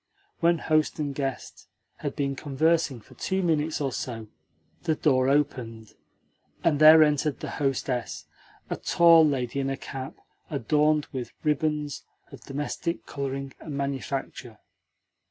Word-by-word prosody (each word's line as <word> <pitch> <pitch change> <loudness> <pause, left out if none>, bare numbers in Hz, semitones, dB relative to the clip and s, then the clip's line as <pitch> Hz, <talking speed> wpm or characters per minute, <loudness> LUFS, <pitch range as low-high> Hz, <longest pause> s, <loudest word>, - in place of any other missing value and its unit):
When 170 0 +3
host 155 -1 +1
and 145 -3 -2
guest 135 -2 -5 0.3
had - - -4
been 140 -1 -1
conversing 145 -2 0
for - - -18
two 190 0 -2
minutes 160 -2 0
or 140 -2 -1
so 115 -4 -5 0.5
the 160 -3 0
door 130 -4 +2
opened, 125 -6 -1 0.7
and 150 -4 +2
there 155 +1 +9
entered 150 -1 +1
the - - -5
hostess 130 -3 -2 0.4
a - - -3
tall 170 -1 +6
lady 135 -3 0
in 135 0 -1
a 135 - -2
cap 135 -1 -7 0.3
adorned 150 +2 +2
with 125 -2 -5
ribands 150 -1 -1 0.3
of - - -11
domestic 145 +4 -4
colouring 135 -1 -4
and 145 -3 -6
manufacture. 135 -3 -4
145 Hz, 135 wpm, -26 LUFS, 135-155 Hz, 0.7 s, there